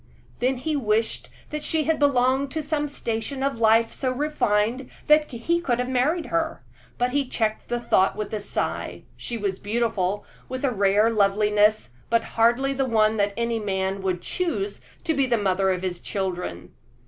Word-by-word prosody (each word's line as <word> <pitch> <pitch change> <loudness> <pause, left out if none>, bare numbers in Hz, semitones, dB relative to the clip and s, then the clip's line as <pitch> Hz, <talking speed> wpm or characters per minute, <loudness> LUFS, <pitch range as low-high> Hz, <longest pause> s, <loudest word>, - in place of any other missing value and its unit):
Then 255 +1 +1
he 300 +5 -2
wished 225 -4 0 0.2
that 300 0 -3
she 315 0 0
had 320 +1 +1
belonged 265 -1 +3
to 315 -1 -2
some 295 0 -1
station 265 0 -3
of 275 -4 -1
life 225 0 +4
so 260 -2 -1
refined 255 -4 0 0.2
that 300 0 +4
he 335 +9 -1
could 245 -8 0
have 250 0 -1
married 285 +7 +1
her; 325 -1 -1 0.3
but 245 +1 +1
he 280 0 0
checked 220 -3 -1
the 240 - -1
thought 195 -5 +2
with 210 +1 -5
a 215 - -1
sigh. 205 - -3
She 235 - -4
was 200 -3 -2
beautiful 205 -3 -1 0.2
with 260 +2 -3
a 265 - +2
rare 205 +1 +3
loveliness, 210 - +3 0.2
but 230 0 +2
hardly 240 +4 +3
the 270 0 0
one 220 -2 +2
that 200 -1 +1
any 235 -1 0
man 195 -1 -2
would 185 -2 -2
choose 365 +3 -2 0.2
to 320 - +1
be 275 -3 +1
the 240 -2 +2
mother 190 -2 +1
of 185 -1 -1
his 180 -2 -3
children. 180 - -4
235 Hz, 180 wpm, -24 LUFS, 210-275 Hz, 0.3 s, life